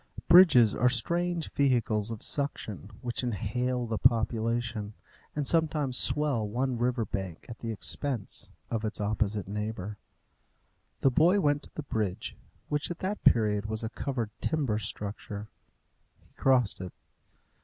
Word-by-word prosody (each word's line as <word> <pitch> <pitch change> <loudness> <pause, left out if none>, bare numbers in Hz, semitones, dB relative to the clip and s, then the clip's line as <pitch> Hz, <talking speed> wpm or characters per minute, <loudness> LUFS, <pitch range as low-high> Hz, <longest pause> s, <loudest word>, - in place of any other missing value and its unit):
Bridges 145 - +8
are 125 - +3
strange 170 +7 0
vehicles 115 -6 +1
of 115 -2 -6
suction, 110 -8 -3
which 120 -2 -2
inhale 125 +2 -1
the 110 -2 -2
population, 115 -2 +1 0.4
and 145 -2 -1
sometimes 155 -5 +1
swell 140 -7 +2
one 125 +2 -1
river 120 -1 +1
bank 95 -4 -5
at 115 - -9
the 115 - -4
expense 120 +1 -2 0.2
of 115 -1 -1
its 110 0 -2
opposite 105 -1 -1
neighbour. 105 0 -4 1.0
The 135 - +4
boy 175 +9 +4
went 145 -4 +2
to - - -15
the 155 - -4
bridge, 105 -8 -3 0.3
which 150 0 -1
at 175 - -4
that 200 +3 -3
period 105 -2 +3
was 110 +1 -2
a 110 - -2
covered 120 -3 -3
timber 135 -9 0
structure. 105 0 -5 0.7
He - - -29
crossed 125 -8 +2
it. 90 -2 -7
115 Hz, 140 wpm, -29 LUFS, 105-140 Hz, 1.0 s, Bridges